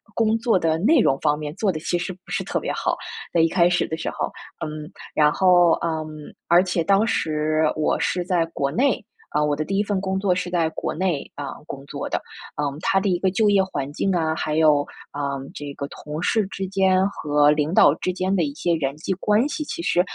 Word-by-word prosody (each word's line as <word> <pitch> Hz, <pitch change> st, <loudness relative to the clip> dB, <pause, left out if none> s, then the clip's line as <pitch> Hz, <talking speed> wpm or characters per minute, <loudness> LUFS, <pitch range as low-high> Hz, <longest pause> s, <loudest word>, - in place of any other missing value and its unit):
工 225 Hz, 0 st, +2 dB
作 225 Hz, -5 st, +2 dB
的 160 Hz, -1 st, +1 dB
内 260 Hz, -, +4 dB
容 135 Hz, -10 st, +2 dB
方 150 Hz, -1 st, +1 dB
面 150 Hz, -1 st, -4 dB
做 200 Hz, 0 st, +1 dB
得 155 Hz, -, -5 dB
其 175 Hz, +2 st, -1 dB
实 175 Hz, +2 st, -4 dB
不 185 Hz, -, -20 dB
是 -, -, -2 dB
特 -, -, -2 dB
别 -, -, -3 dB
好， -, -, -1 dB, 0.4 s
在 170 Hz, -, +4 dB
一 165 Hz, -, +5 dB
开 175 Hz, -1 st, +4 dB
始 180 Hz, -, +1 dB
的 160 Hz, -, -4 dB
时 165 Hz, -, -5 dB
候。 -, -, -2 dB, 0.4 s
嗯， 155 Hz, -1 st, -5 dB, 0.3 s
然 150 Hz, -1 st, +5 dB
后， 175 Hz, -1 st, +5 dB
嗯， 160 Hz, -2 st, -1 dB, 0.4 s
而 175 Hz, +1 st, +6 dB
且 180 Hz, -2 st, -1 dB
当 195 Hz, +5 st, +3 dB
时 155 Hz, -4 st, 0 dB
我 155 Hz, -, 0 dB
是 180 Hz, -1 st, 0 dB
在 175 Hz, -2 st, +1 dB
国 140 Hz, -4 st, -2 dB
内， 260 Hz, -, +1 dB, 0.3 s
啊， 150 Hz, -, +1 dB
我 150 Hz, -1 st, +1 dB
的 155 Hz, -, -2 dB
第 195 Hz, +3 st, -1 dB
1 205 Hz, -, +3 dB
份 200 Hz, -2 st, -1 dB
工 190 Hz, 0 st, -1 dB
作 190 Hz, -2 st, +2 dB
是 185 Hz, -, -2 dB
在 170 Hz, -3 st, +1 dB
国 -, -, -3 dB
内， 175 Hz, -5 st, -1 dB
啊， 145 Hz, -2 st, -5 dB, 0.2 s
工 135 Hz, 0 st, -7 dB
作 -, -, -5 dB
的， -, -, -1 dB, 0.4 s
嗯， 145 Hz, -1 st, -2 dB
它 195 Hz, +1 st, +2 dB
的 195 Hz, 0 st, 0 dB
一 180 Hz, -, +2 dB
个 190 Hz, 0 st, +1 dB
就 210 Hz, +2 st, +3 dB
业 195 Hz, -1 st, +4 dB
环 145 Hz, -7 st, -4 dB
境 195 Hz, +5 st, 0 dB
啊， 160 Hz, -2 st, 0 dB
还 155 Hz, -1 st, -2 dB
有， 155 Hz, -2 st, +5 dB, 0.3 s
呃， 140 Hz, -1 st, -2 dB, 0.2 s
这 145 Hz, -1 st, -6 dB
个 140 Hz, -, -4 dB
同 150 Hz, +2 st, -7 dB
事 215 Hz, +3 st, +2 dB
之 195 Hz, 0 st, -5 dB
间 190 Hz, 0 st, +3 dB
和 150 Hz, -5 st, +2 dB
领 150 Hz, +2 st, 0 dB
导 145 Hz, -, +6 dB
之 185 Hz, -, -2 dB
间 185 Hz, +2 st, 0 dB
的 175 Hz, -, +2 dB
一 145 Hz, -2 st, -2 dB
些 170 Hz, +2 st, 0 dB
人 140 Hz, -3 st, -2 dB
际 180 Hz, +4 st, -2 dB
关 210 Hz, +7 st, +2 dB
系， 305 Hz, -, -3 dB
其 340 Hz, -, -5 dB
实， 175 Hz, -, +3 dB
170 Hz, 250 characters per minute, -23 LUFS, 150-190 Hz, 0.4 s, 而